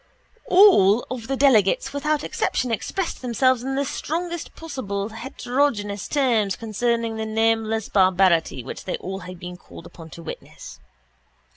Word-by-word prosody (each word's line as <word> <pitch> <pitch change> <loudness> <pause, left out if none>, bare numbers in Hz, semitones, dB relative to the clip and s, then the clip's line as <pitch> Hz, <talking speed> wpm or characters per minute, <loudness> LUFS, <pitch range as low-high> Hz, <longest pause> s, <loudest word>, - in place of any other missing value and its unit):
All 245 - +6
the 255 +3 -4
delegates 235 -8 +3
without 300 +1 0
exception 250 -2 -1
expressed 345 - -3
themselves 255 0 +2
in 270 +2 -3
the 280 +1 0
strongest 340 +4 -4
possible 220 -10 -4
heterogeneous 225 -3 -2
terms 230 -9 +1
concerning 230 +1 -1
the 220 - -3
nameless 225 0 +1
barbarity 185 - +3
which 130 - -8
they 185 - -2 0.3
had 180 -1 -9
been 180 0 -8
called 170 - -13
upon 170 -1 -12
to 170 - -11
witness. - - -9
225 Hz, 130 wpm, -23 LUFS, 200-270 Hz, 0.3 s, All